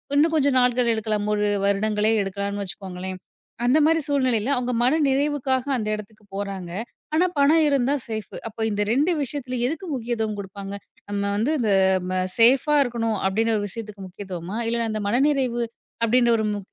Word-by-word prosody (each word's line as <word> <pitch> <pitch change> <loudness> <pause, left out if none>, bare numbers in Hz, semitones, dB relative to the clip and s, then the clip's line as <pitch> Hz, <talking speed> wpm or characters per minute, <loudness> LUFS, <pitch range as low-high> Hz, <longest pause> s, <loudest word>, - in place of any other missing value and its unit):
இன்னும் 315 +3 +4
கொஞ்சம் 280 -3 +3
நாள்கள் 250 -1 +2
எடுக்கலாம் 215 -1 -1
1 210 0 +1 0.2
வருடங்களே 210 +2 +1
எடுக்கலான்னு 200 +1 -3
வச்சுக்கோங்களேன். 185 -1 -6 0.5
அந்த 250 +5 +4
மாரி 325 +1 +3
சூழ்நிலையில 260 -4 +1
அவங்க 250 0 -1
மனநிறைவுக்காக 275 -1 +1
அந்த 215 -3 -3
இடத்துக்கு 210 +1 -11
போறாங்க. 195 -3 -4 0.5
ஆனா 345 +3 +4
பணம் 310 +3 +5
இருந்தா 275 -1 +2
சேஃப், 220 -3 -5
அப்ப 220 - -17
இந்த 205 0 -1
2 290 +9 +2
விஷயத்துல 255 -2 -4
எதுக்கு 320 +7 -4
முக்கியத்துவம் 225 -4 -2
குடுப்பாங்க? 195 0 -7 0.4
நம்ம 200 0 -1
வந்து 230 +8 +1
இந்த 220 -4 +1 0.4
ம 185 0 +1 0.2
சேஃப்பா 260 +6 +5
இருக்கணும் 230 -3 -1
அப்டின்னு 225 +3 +1
ஒரு 205 - -2
விஷயத்துக்கு 210 -2 -8
முக்கியத்துவமா? 185 0 -6
இல்லன்னா 230 0 0
இந்த 215 0 -3
மனநிறைவு 255 -1 +1 0.4
அப்டின்ற 240 +1 +3
ஒரு 220 - 0
மு 205 - -3
230 Hz, 155 wpm, -24 LUFS, 205-260 Hz, 0.5 s, பணம்